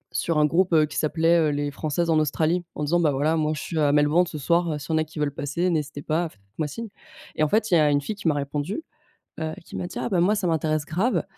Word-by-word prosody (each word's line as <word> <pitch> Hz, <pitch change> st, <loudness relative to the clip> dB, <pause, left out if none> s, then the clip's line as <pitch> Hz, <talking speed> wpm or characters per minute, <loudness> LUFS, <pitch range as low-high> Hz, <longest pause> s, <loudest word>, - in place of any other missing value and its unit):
Sur 165 Hz, -2 st, 0 dB
un 150 Hz, -, +5 dB
groupe, 175 Hz, +3 st, +2 dB
heu, 155 Hz, -1 st, +5 dB
qui 150 Hz, -, -10 dB
s'appelait, 165 Hz, +2 st, +3 dB
heu, 155 Hz, -2 st, +3 dB
les 145 Hz, 0 st, -1 dB
françaises 160 Hz, +4 st, -1 dB
en 155 Hz, -, +4 dB
Australie. 160 Hz, +3 st, +1 dB
En -, -, -3 dB
disant: 170 Hz, +4 st, +2 dB
«Bah, 155 Hz, -3 st, +3 dB
voilà 150 Hz, +4 st, +1 dB
moi 155 Hz, -1 st, 0 dB
je 145 Hz, -, -5 dB
suis 165 Hz, -, -3 dB
à 145 Hz, -2 st, +3 dB
Melbourne 150 Hz, +4 st, +3 dB
ce 155 Hz, -, -6 dB
soir, 170 Hz, +3 st, +1 dB
heu, 150 Hz, -, -3 dB
si 145 Hz, -, -8 dB
il -, -, -1 dB
y -, -, +2 dB
en -, -, +3 dB
a -, -, +2 dB
qui 155 Hz, -, -14 dB
veulent 150 Hz, -1 st, -1 dB
passer, 170 Hz, +6 st, -1 dB
n'hésitez 150 Hz, -2 st, -3 dB
pas, 165 Hz, +2 st, 0 dB
faites 105 Hz, -, -24 dB, 0.2 s
moi 155 Hz, -, 0 dB
signe» 225 Hz, +9 st, -7 dB, 0.5 s
et -, -, -3 dB
en 155 Hz, -, +3 dB
fait 215 Hz, -1 st, +1 dB
il -, -, +6 dB
y -, -, +6 dB
a 150 Hz, -1 st, +4 dB
une 145 Hz, 0 st, +2 dB
fille 210 Hz, -, -4 dB
qui 200 Hz, -4 st, -4 dB
m'a 150 Hz, -, +3 dB
répondu, 145 Hz, -, -3 dB, 0.6 s
heu, 160 Hz, 0 st, -2 dB
qui -, -, -9 dB
m'a 175 Hz, -, -3 dB
dit: -, -, -7 dB
«Ah -, -, -2 dB
bah, 190 Hz, -, 0 dB
moi 190 Hz, +5 st, +3 dB
ça 200 Hz, -4 st, -1 dB
m'intéresse 155 Hz, -2 st, 0 dB
grave» 180 Hz, -, 0 dB
155 Hz, 300 wpm, -24 LUFS, 150-175 Hz, 0.6 s, il